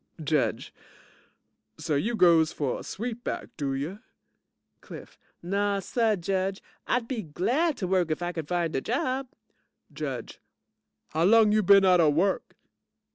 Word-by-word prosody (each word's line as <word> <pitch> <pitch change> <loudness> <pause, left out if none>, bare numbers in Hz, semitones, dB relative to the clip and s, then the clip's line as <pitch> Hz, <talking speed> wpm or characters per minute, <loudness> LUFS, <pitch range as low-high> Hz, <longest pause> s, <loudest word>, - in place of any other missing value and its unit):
JUDGE 150 -2 -1 1.0
So, 160 - -3
you 210 +12 0
goes 165 -5 +5
for 140 -4 -2
a - - -9
sweet 240 +2 -5
back, - - -4
do 140 -3 -2
you? 155 +9 -4 0.8
CLIFF - - -12 0.2
Naw 200 +3 0
suh, 225 +2 +1
Judge. 190 +1 -2 0.3
I'd 245 -2 0
be 245 -4 -3
glad 250 - 0
to 185 - -3
work 180 -2 +1
if 155 +2 -2
I 175 - -2
could 160 -4 -6
find 170 -2 -1
a 135 - 0
job. 260 - -2 0.7
JUDGE - - -6 0.7
How 160 +2 0
long 220 +1 +5
you 215 0 +3
been 195 0 +6
outa 180 -4 +5
work? 175 +7 0
190 Hz, 145 wpm, -27 LUFS, 160-220 Hz, 1.0 s, been